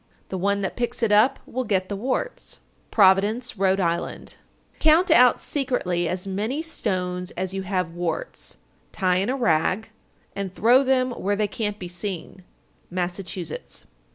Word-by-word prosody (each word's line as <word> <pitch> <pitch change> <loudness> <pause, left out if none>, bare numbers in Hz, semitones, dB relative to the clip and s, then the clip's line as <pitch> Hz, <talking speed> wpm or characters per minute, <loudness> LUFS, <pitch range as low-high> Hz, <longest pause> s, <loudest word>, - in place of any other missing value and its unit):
The 190 - -3
one 200 +2 +1
that 190 - -3
picks 240 0 -1
it 220 - +2
up 225 +7 +5
will 255 +1 -3
get 190 -5 0
the 200 - -3
warts. 260 - -3 0.3
Providence, 205 +4 +3
R.I. 190 -1 +3
911. 170 -3 -2 0.5
Count 320 +4 +4
out 250 0 +6
secretly 220 - -1
as 185 +1 -3
many 215 +10 -2
stones 180 - -2
as 185 +1 -2
you 195 - -2
have 185 -3 -2
warts, 175 - -4 0.3
tie 185 -2 +1
in 195 +4 0
a 265 - 0
rag, 220 0 +1 0.4
and 200 -2 -3
throw 240 +8 +4
them 255 -1 +2
where 205 -3 -1
they 210 0 +1
can't 210 0 -3
be 180 - -6
seen. 180 0 -6 0.5
_Massachusetts. 180 -2 -4
200 Hz, 155 wpm, -24 LUFS, 185-245 Hz, 0.5 s, out